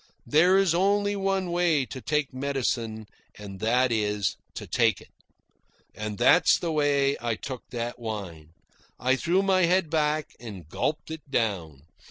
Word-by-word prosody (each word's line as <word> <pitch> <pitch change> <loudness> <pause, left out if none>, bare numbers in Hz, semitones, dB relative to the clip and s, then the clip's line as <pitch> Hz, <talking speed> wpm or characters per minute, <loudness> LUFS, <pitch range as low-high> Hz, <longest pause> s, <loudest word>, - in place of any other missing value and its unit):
There 175 +5 +4
is 195 -4 +3
only 205 +3 +2
one 195 -2 -1
way 170 -6 +2
to 130 +3 -8
take 150 -1 -1
medicine, 125 -5 -2 0.3
and 100 -2 -9
that 120 +4 +2
is 105 -3 0 0.2
to - - -6
take 115 -5 +2
it. - - -18 0.8
And 105 -1 -5
that - - +5
is - - +6
the 170 - -3
way 145 -2 +2
I 120 -2 -1
took 130 +2 -8
that 120 0 -4
wine. 95 -9 -6 0.5
I 130 +1 +2
threw 175 +8 +1
my 190 -2 +3
head 175 -2 +1
back 155 -1 0
and 100 -9 -9
gulped 150 - -3
it 160 -2 -8
down. 90 - -2
135 Hz, 160 wpm, -26 LUFS, 110-165 Hz, 0.8 s, is